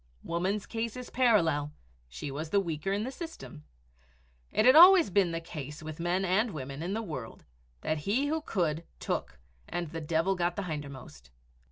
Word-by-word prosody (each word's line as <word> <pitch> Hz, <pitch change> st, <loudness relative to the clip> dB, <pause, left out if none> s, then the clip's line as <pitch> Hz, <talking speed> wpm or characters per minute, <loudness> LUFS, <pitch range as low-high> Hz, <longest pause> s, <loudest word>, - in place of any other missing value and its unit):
Woman's 185 Hz, +5 st, -1 dB
case 230 Hz, 0 st, -3 dB
was 250 Hz, -1 st, -8 dB
parallel 165 Hz, -, +2 dB, 0.4 s
she 135 Hz, -, -6 dB
was 155 Hz, +3 st, -5 dB
the 200 Hz, -, +3 dB
weaker 170 Hz, -1 st, -2 dB
in 200 Hz, +2 st, 0 dB
the 255 Hz, -, -4 dB
system. 270 Hz, -, -9 dB, 0.9 s
It 215 Hz, -, +2 dB
had 255 Hz, -, +8 dB
always 350 Hz, -, +9 dB
been 190 Hz, -3 st, +3 dB
the 165 Hz, -, -2 dB
case 150 Hz, -1 st, -8 dB
with 155 Hz, 0 st, -7 dB
men 175 Hz, +3 st, 0 dB
and 205 Hz, +6 st, +2 dB
women 135 Hz, 0 st, -6 dB
in 180 Hz, +5 st, -2 dB
the 225 Hz, -, -2 dB
world 140 Hz, -, -7 dB, 0.4 s
that 155 Hz, -, -1 dB
he 210 Hz, -, 0 dB
who 315 Hz, +2 st, -1 dB
could 170 Hz, -, -1 dB, 0.2 s
took -, -, -3 dB, 0.3 s
and 175 Hz, -2 st, -3 dB
the 165 Hz, -1 st, -5 dB
devil 165 Hz, +4 st, +1 dB
got 175 Hz, -1 st, 0 dB
the 200 Hz, -, -3 dB
hindermost. 140 Hz, -, -7 dB
175 Hz, 180 wpm, -30 LUFS, 150-215 Hz, 0.9 s, always